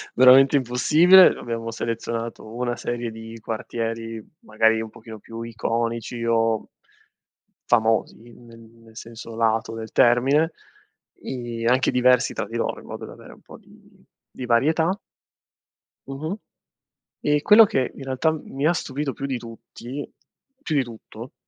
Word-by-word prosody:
Veramente 130 +2 +7
impossibile. 150 +9 +6
Abbiamo 115 -1 -5
selezionato 115 0 -4
una 120 0 -2
serie 120 -1 -4
di 110 +1 -10
quartieri, 115 0 -5 0.2
magari, 110 +1 +2
un 110 - -6
pochino 110 0 -12
più 115 +2 -9
iconici, 115 +1 -3
o 115 -1 +1 1.0
famosi, 115 -2 +2
ne 120 0 -16
nel 115 0 -18
senso 115 0 -9
lato 115 0 0
del 110 0 -7
termine, 135 +7 +3 0.7
i 120 -3 -5
anche 125 +3 +3
diversi 125 +1 +3
tra - - -3
di 115 - -9
loro - - -2
in - - -15
modo - - -7
da - - -11
avere - - -14
un - - -20
po' - - -14
di - - -22 0.3
di 130 - -6
varietà 160 - +2 1.1
Mh-mh. 150 +7 -4 0.9
E 150 0 +1
quello 215 +5 +8
che, 165 - -1
in 140 - -9
realtà, 135 +4 0
m 155 - -5
mi 140 +3 0
ha 175 - +3
stupito 140 -3 -3
più 140 - -6
di 135 -2 -2
tutti 120 +3 -9 0.5
più 160 - -3
di 140 - +3
tutto, 115 0 -11
120 Hz, 145 wpm, -23 LUFS, 115-135 Hz, 1.1 s, quello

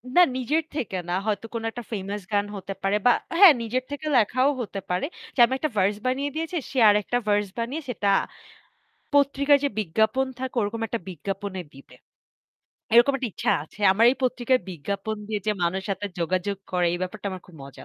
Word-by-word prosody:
না 360 - +8 0.2
নিজের 300 +6 0
থেকে 220 -10 -3
না - - 0
হয়তো 215 +1 -1
কোনো 225 -1 -3
একটা 240 0 -7
ফেমাস 200 0 -4
গান 205 0 +2
হতে 195 0 -6
পারে 195 +1 +2
বা 245 - +7 0.3
হ্যাঁ 380 -7 +10
নিজের 245 +3 -2
থেকে 290 +2 -5
লেখাও 255 +5 +3
হতে 205 -3 -5
পারে 180 +6 0 0.3
যে - - -5
আমি 260 - -3
একটা 305 +3 -1
ভার্স 200 +2 +3
বানিয়ে 270 +3 0
দিয়েছি 325 +2 -2
সে 270 - -6
আরেকটা 210 +4 +2
ভার্স 205 0 +2
বানিয়ে 255 +7 -3
সেটা 210 -4 -2 1.1
পত্রিকায় 280 0 +4
যে 285 - +2
বিজ্ঞাপন 220 +7 +1
থাকে 260 -1 -4
ওরকম 210 +3 -3
একটা 230 +2 -3
বিজ্ঞাপনে 195 +3 -5
দিবে। 135 -2 -15 1.0
এরকম 240 +4 +7
একটা 250 -3 -3
ইচ্ছা - - -1
আছে। 160 +7 -15
আমার 220 +4 +3
এই 265 - -2
পত্রিকায় 255 0 +2
বিজ্ঞাপন 200 +6 -4
দিয়ে 210 -2 -2
যে 215 - +3
মানুষের 190 +3 -1
হাতে 205 - -4
যোগাযোগ 185 +4 -1 0.2
করে 180 -1 +2
এই 175 - -2
ব্যাপারটা 200 +2 -5
আমার 185 - -6
খুব 180 - -16
মজা 140 - -12
215 Hz, 190 wpm, -25 LUFS, 195-255 Hz, 1.1 s, হ্যাঁ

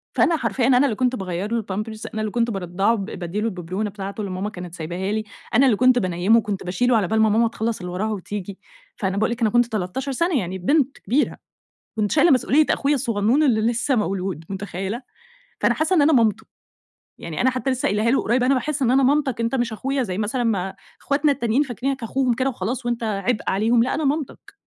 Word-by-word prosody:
فأنا 335 - +3
حرفيًا 245 -1 0
أنا 255 - +5
اللي 230 - 0
كنت 250 +2 +1
باغيَّر 190 0 -4
له 230 0 +1
الpampers 215 +2 -5
أنا 215 - -2
اللي 215 - -2
كنت 235 +1 0
بارضعه 195 +3 0
ب 200 -3 -4
بادِّي 195 0 -4
له 225 - 0
الببرونة 185 +1 -3
بتاعته 200 +1 -6
اللي 200 - -4
ماما 190 +3 -3
كانت 180 -4 -8
سايباها 175 +4 -4
لي، 215 0 -1 0.3
أنا 260 +5 +5
اللي 250 -5 +4
كنت 255 0 +5
بانيمُه 185 +5 +2
وكنت 205 -4 -4
باشيله 230 +7 +2
على 200 -4 +1
بال 220 +2 +1
ما 220 - +4
ماما 225 +2 +3
تخلّص 225 0 -3
اللي 180 -1 -6
وراها 210 +5 -2
وتيجي، 200 -1 -5 0.4
فأنا 190 -1 -2
باقول 220 +3 +1
لِك 235 0 -4
أنا 220 - +3
كنت 240 +2 +3
13 225 +5 -3
سنة 335 +2 +1
يعني 185 -2 -4
بنت 275 - +1
كبيرة، 255 +9 0 0.6
كنت 210 -2 0
شايلة 310 +2 +5
مسؤولية 270 +4 +4
أخويا 285 +1 +2
الصغنون 230 +2 +1
اللي 240 -7 +3
لسه 235 +4 +1
مولود، 190 -5 -2
متخيلة، 195 +4 -4 0.6
فأنا - - +3
حاسّة 320 +4 +1
إن 300 - +5
أنا 315 - +4
مامته، 225 -4 +2 0.7
يعني 165 -2 -5
أنا 260 - +4
حتى 255 +1 -2
لسه 260 0 -2
قايلاها 210 +3 +1
له 270 - +2
قريب، 245 +3 +1
أنا 260 +2 +3
باحس 285 +2 -1
إن 250 -2 +3
أنا 270 +1 +4
مامتك 270 -2 +2
أنت 230 +3 0
مش 240 -3 -1
أخويا 270 +5 -1
زي 185 -5 -4
مثلًا 220 +4 -1
ما 195 -5 -1 0.3
اخواتنا 285 +1 +2
التانيين 260 0 +1
فاكرينك 265 +1 -3
أخوهم 255 +2 +1
كده 260 +3 0
وخلاص، 240 +2 -4
وأنت 240 -1 -2
عبء 215 +1 -1
عليهم، 230 +4 +3
لأ 255 - -1
أنا 315 - -2
مامتك، 290 0 -3
225 Hz, 220 wpm, -22 LUFS, 195-255 Hz, 0.7 s, أنا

